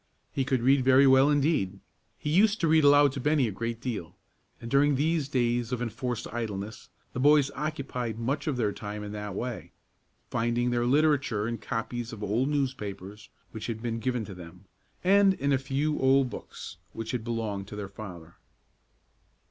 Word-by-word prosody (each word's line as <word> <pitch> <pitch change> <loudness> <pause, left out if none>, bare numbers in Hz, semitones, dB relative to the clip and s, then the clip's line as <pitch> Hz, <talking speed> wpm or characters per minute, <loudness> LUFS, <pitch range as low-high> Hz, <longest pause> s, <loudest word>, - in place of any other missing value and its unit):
He 135 - 0
could 130 -3 0
read 135 +1 +4
very 130 +1 +6
well 135 +1 +6
indeed. 145 - +1 0.4
He 150 - -3
used 210 +5 +4
to 165 - +3
read 160 0 +4
aloud 145 0 +6
to 135 - -5
Bennie 145 -1 +2
a - - -3
great 115 +3 -4
deal, 105 -9 -5 0.4
and 115 0 -8
during 140 +1 +4
these 155 0 0
days 120 -2 0
of 125 - -1
enforced 120 0 -3
idleness 110 -2 -5 0.2
the - - -4
boys 145 0 +5
occupied 140 -6 -4
much 130 +7 -2
of 145 -4 0
their 110 -4 +1
time 105 +1 -6
in 105 - -6
that 105 -2 -5
way; 120 +2 -5 0.6
finding 120 +1 0
their 120 0 +1
literature 140 -6 +2
in 115 0 -3
copies 120 0 -4
of 110 -2 -8
old 120 +8 0
newspapers 105 -8 -4 0.2
which 110 -1 -6
had 115 -1 -5
been 115 -1 -2
given 125 -1 -1
to 100 - -8
them, 90 +1 -12 0.4
and 195 +1 +5
in 140 -3 0
a 135 - +2
few 140 +3 -1
old 135 -1 +3
books - - -9 0.2
which 115 0 -5
had 125 -3 -3
belonged 110 -4 -3
to 105 - -8
their 105 -1 -5
father. 90 -5 -10
120 Hz, 180 wpm, -28 LUFS, 110-140 Hz, 0.6 s, very